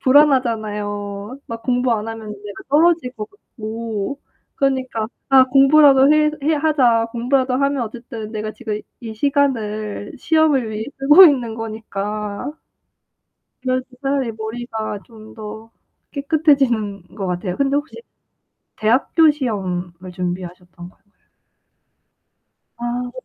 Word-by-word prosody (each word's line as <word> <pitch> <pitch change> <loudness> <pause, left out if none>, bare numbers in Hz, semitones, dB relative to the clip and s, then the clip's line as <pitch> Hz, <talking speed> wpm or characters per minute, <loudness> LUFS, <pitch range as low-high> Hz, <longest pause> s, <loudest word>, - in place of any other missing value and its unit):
불안하잖아요. 215 -6 +1
막 230 0 -7
공부 250 0 +1
안 220 0 -2
하면 225 -1 -7 0.2
내가 205 -2 -8
떨어질 320 -2 +3
것 215 -4 -7
같고 225 - -6 0.3
그니까 260 -5 -1 0.2
'아 265 -1 +8
공부라도 275 +1 +6
해 305 0 +4
해 310 +2 +2
하자. 260 -7 +3
공부라도 255 +2 +1
하면 275 -1 +1
어쨌든 225 -1 -8
내가 215 0 -3
지금 215 -3 -5 0.2
이 225 -3 -7
시간을 215 -6 -1
시험을 310 -7 +2
위해 215 +1 -4
쓰고 295 +7 +8
있는 250 -8 +3
거니까.' 215 +1 -5 1.1
그래서 255 0 -1 0.2
차라리 270 -4 0
머리가 220 -1 -5
좀 220 -2 -14
더 220 +1 -9 0.4
깨끗해지는 275 - +1
것 195 -3 -4
같아요. 180 0 -3
근데 280 0 +1
혹시 290 +2 -3 0.8
대학교 270 +8 +4
시험을 185 - -4
준비하셨던 180 -1 -6
건 - - -26 1.8
아. 245 +1 -3
230 Hz, 255 characters per minute, -20 LUFS, 215-275 Hz, 1.8 s, 아